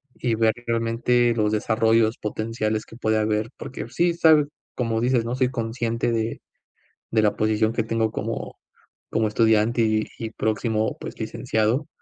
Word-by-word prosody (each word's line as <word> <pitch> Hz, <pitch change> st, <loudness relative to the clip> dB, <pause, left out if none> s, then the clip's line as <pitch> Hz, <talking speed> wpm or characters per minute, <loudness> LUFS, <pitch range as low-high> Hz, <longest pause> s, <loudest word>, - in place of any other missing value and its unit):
y 120 Hz, -3 st, -1 dB
ver 110 Hz, 0 st, +3 dB
realmente 115 Hz, +1 st, +2 dB
los 105 Hz, -2 st, +1 dB
desarrollos 110 Hz, +1 st, +2 dB
potenciales 110 Hz, 0 st, -2 dB
que -, -, -14 dB
puede 110 Hz, -2 st, +1 dB
haber, 110 Hz, +1 st, 0 dB
porque 115 Hz, -3 st, -7 dB
sí 170 Hz, +7 st, +1 dB
sabes, 160 Hz, -3 st, +5 dB, 0.3 s
como 115 Hz, -2 st, -1 dB
dices, 125 Hz, -1 st, +2 dB
¿no?, 120 Hz, +2 st, -2 dB
soy 130 Hz, -1 st, +2 dB
consciente 115 Hz, 0 st, -1 dB
de 115 Hz, 0 st, -2 dB, 0.7 s
de 110 Hz, -1 st, +3 dB
la 105 Hz, -1 st, +2 dB
posición 110 Hz, +1 st, +1 dB
que 115 Hz, -, 0 dB
tengo 115 Hz, 0 st, 0 dB
como -, -, -4 dB, 0.5 s
como 110 Hz, 0 st, +1 dB
estudiante, 110 Hz, +1 st, +3 dB
y 110 Hz, -1 st, +1 dB
y 115 Hz, -, -4 dB
próximo, 110 Hz, 0 st, -1 dB
pues, -, -, -8 dB
licenciado, 110 Hz, +8 st, -1 dB
115 Hz, 155 wpm, -24 LUFS, 110-120 Hz, 0.7 s, sabes